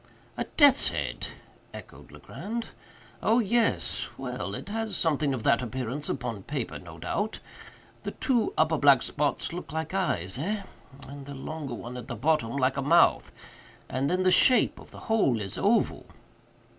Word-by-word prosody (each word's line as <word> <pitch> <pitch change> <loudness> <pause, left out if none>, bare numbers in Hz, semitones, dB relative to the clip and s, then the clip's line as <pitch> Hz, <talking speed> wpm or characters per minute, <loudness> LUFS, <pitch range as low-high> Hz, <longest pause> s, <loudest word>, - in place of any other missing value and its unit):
"A - - -2
death's 285 -3 +6
head!" - - -3 0.5
echoed - - -12
Legrand. 230 +2 -6 0.5
"Oh—yes—well, 230 0 0
it - - -7
has 225 0 -2
something 150 -3 +1
of 130 -4 -3
that 115 - +4
appearance 130 +4 -3
upon 115 -5 -3
paper, 135 +3 -4
no 85 -2 -11
doubt. 205 - -2 0.6
The - - -4
two 245 -5 0
upper 155 -1 +3
black 140 -3 +6
spots 145 +2 -1
look 170 -4 -6
like 160 +2 -3
eyes, 105 - -1
eh? 200 +6 -2 0.4
and 140 0 -9
the 140 - -7
longer 140 -2 -5
one 120 +2 -7
at 120 -1 -8
the 120 - -4
bottom 140 0 +1
like 130 0 +1
a - - +1
mouth—and 140 -3 +1
then 185 +1 +1
the 185 - +4
shape 255 +6 +4
of - - -13
the - - -12
whole 210 - +2
is 100 -2 -4
oval." 220 +4 +2
145 Hz, 155 wpm, -28 LUFS, 130-195 Hz, 0.6 s, death's